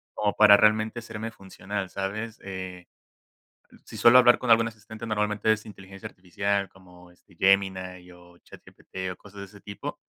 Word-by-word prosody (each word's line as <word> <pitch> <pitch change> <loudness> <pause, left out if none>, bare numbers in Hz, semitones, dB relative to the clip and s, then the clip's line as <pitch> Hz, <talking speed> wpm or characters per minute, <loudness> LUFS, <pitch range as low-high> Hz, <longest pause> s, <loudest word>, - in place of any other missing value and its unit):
como 105 -1 0
para 105 -1 +7
realmente 110 +2 +2
serme 115 0 -7
funcional, 95 -1 -7
¿sabes? 105 +4 -5
Eh, 95 -2 -8 1.0
si - - -10
suelo 120 +2 +7
hablar 120 -1 +6
con 125 -2 -1
algún 115 0 +5
asistente, 110 +1 -10
normalmente 105 0 0
es 110 -1 -1
inteligencia 95 -2 -11
artificial 100 +2 -3
como 90 -1 -18
este 90 +1 -24
Gemini 95 -1 0
o 90 0 -18
ChatGPT, 95 +1 -9
o - - -18
cosas 105 0 -14
de 100 - -7
ese 100 +1 -17
tipo. 100 - -8
100 Hz, 160 wpm, -26 LUFS, 95-110 Hz, 1.0 s, para